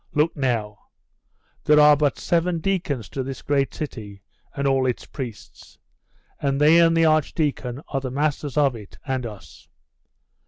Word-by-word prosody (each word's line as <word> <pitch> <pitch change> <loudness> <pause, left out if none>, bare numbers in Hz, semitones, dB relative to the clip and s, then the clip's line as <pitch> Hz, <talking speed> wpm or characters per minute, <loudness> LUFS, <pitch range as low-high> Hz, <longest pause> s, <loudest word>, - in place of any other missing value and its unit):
Look 150 +3 +2
now; 115 -7 -2 0.8
there 150 0 +5
are 150 0 +7
but 145 -1 0
seven 170 0 0
deacons 160 - -2
to 135 - -4
this 130 0 -6
great 140 -1 0
city, 105 -10 -7 0.3
and 140 - -2
all 135 -1 +2
its 125 - -3
priests; 125 -6 -9 0.6
and 140 0 -1
they 155 +3 +6
and 165 0 +4
the 165 - +4
archdeacon 150 -4 0
are 135 - -2
the 130 - -4
masters 145 0 -2
of 140 -4 +3
it 105 -3 -12
and 130 -3 -2
us. 105 -3 -13
140 Hz, 155 wpm, -23 LUFS, 125-150 Hz, 0.8 s, are